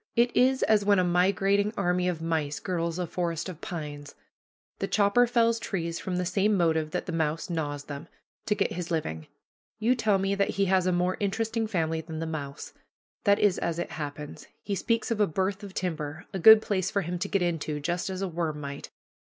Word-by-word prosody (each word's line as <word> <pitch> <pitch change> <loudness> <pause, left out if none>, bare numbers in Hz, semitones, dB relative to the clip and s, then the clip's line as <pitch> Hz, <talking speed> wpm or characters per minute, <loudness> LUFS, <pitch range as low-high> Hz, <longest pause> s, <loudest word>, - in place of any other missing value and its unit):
It 240 +1 +3
is 260 +1 +4
as 215 -2 +4
when 200 0 +4
a 185 - +4
migrating 195 +3 +2
army 180 -1 +1
of 165 -3 -2
mice 155 -3 -1
girdles 170 -2 -2
a 180 - -1
forest 170 -1 -2
of 175 -3 -8
pines. 145 -3 -6 0.6
The - - -1
chopper 210 +4 +4
fells 230 -1 +2
trees 170 -6 -3
from 185 - -3
the 180 0 -1
same 205 +3 +2
motive 160 -3 +2
that - - -3
the - - -4
mouse 160 +1 -1
gnaws 145 -3 -2
them 145 +2 -8 0.4
to 210 - +2
get - - 0
his 175 -1 -4
living. 80 - -3 0.5
You 225 +3 +3
tell 220 -5 +2
me 195 +1 0
that 200 0 +1
he 200 - +3
has 185 -1 +2
a - - +3
more 180 +1 +1
interesting 220 +2 -1
family 165 -5 -1
than 160 0 -7
the 165 - -3
mouse. 145 -3 -6 0.5
That 200 -1 +5
is 200 -3 +2
as 170 -1 -2
it 175 - -3
happens. 150 0 -6 0.2
He 205 - -3
speaks 230 +4 0
of 225 - 0
a 205 - +4
"berth" 190 +4 -1
of 200 -2 -9
timber, 160 -3 -3
a 190 - -2
good 220 +4 +9
place 190 -2 0
for 200 - 0
him 175 +1 -3
to 200 - -2
get 195 -2 +1
into, 160 -3 -2
just 175 +5 -2
as 190 0 -3
a - - 0
worm 165 -3 -2
might. 140 -1 -7
180 Hz, 215 wpm, -28 LUFS, 160-200 Hz, 0.6 s, good